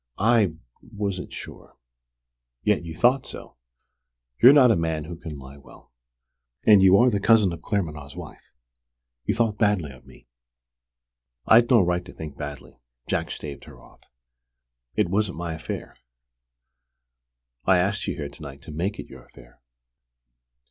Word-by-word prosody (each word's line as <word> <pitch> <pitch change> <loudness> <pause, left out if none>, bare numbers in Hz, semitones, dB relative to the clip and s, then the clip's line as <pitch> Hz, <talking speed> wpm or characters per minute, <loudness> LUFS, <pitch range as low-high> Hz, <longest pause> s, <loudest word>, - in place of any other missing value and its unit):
"I 105 -5 +3 0.3
wasn't 100 -3 -5
sure." - - -11 0.9
"Yet 105 -4 +1
you 80 -1 -8
thought 125 - +2
so! - - -10 0.8
You're 125 - +10
not 135 -4 +6
a - - +3
man 80 -2 -2
who 85 +3 -8
can 80 -3 -8
lie 70 +1 -12
well. 70 - -18 0.7
And 105 -3 +7
you 95 0 +6
are 125 +2 +4
the 100 - 0
cousin 105 -3 +4
of 85 - -9
Claremanagh's 75 -9 -4
wife. 90 -3 -11 0.7
You - - 0
thought 110 -3 0
badly 105 -9 +1
of 65 -1 -17
me." - - -17 1.2
"I'd 120 +1 +5
no 120 -6 +5
right 90 0 0
to 90 - -13
think 75 -3 -8
badly," 75 -3 -9 0.3
Jack - - -2
staved 70 -2 -8
her - - -14
off. - - -20 0.9
"It 105 -3 +2
wasn't 100 0 -1
my 85 -1 -4
affair!" 80 - -7 1.7
"I 95 -1 +5
asked 100 +3 -1
you - - -2
here 75 -3 -5
to 70 - -15
night 70 -2 -10
to - - -10
make 90 +7 -3
it - - -7
your - - -14
affair." - - -19
90 Hz, 155 wpm, -24 LUFS, 75-105 Hz, 1.7 s, You're